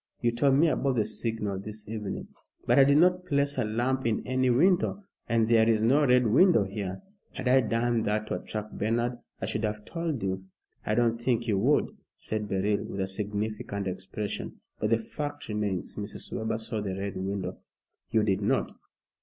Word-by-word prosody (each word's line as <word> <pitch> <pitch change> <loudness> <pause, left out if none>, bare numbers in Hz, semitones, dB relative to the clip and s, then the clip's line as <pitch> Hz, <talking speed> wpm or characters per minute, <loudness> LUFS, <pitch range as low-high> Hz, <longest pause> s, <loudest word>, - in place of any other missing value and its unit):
You 120 - +2
told 135 +3 +3
me 160 +5 +5
about 135 -4 +1
the 110 -3 +2
signal 105 -4 -2
this 105 +1 -8
evening." 105 -2 -5 0.4
"But - - +4
I 135 - +8
did 140 +1 +5
not 180 +2 +4
place 140 -5 +1
a - - +2
lamp 120 +4 0
in 110 - -1
any 130 0 +1
window, 180 +9 +3 0.3
and 115 -1 +3
there 115 -1 +5
is 110 -1 +3
no 135 +6 +4
Red 125 0 +5
Window 130 - +5
here. 100 - -5 0.3
Had - - -4
I 130 +1 +6
done 115 0 +1
that 105 0 0
to - - -3
attract 105 0 -6
Bernard, 120 +3 0 0.2
I - - -2
should 110 +2 -2
have 105 -1 -2
told 165 - -3
you." 95 0 -2 0.4
"I 105 - +2
don't 115 -1 +2
think 120 -1 0
you 100 -4 +2
would," 135 +8 +2 0.2
said 105 -1 -4
Beryl, 100 +2 0
with 100 - -6
a - - +1
significant 105 +1 -3
expression; 95 +3 -5 0.2
"but 105 - 0
the 115 - +4
fact 145 +5 -6
remains, 105 -3 -2
Mrs. 105 0 -4
Webber 110 0 -1
saw 110 -1 -3
the 95 -2 -3
Red 100 0 -4
Window." 95 0 -3 0.5
"You 110 -1 +2
did 100 -3 +1
not." - - +1
110 Hz, 190 wpm, -28 LUFS, 105-125 Hz, 0.5 s, I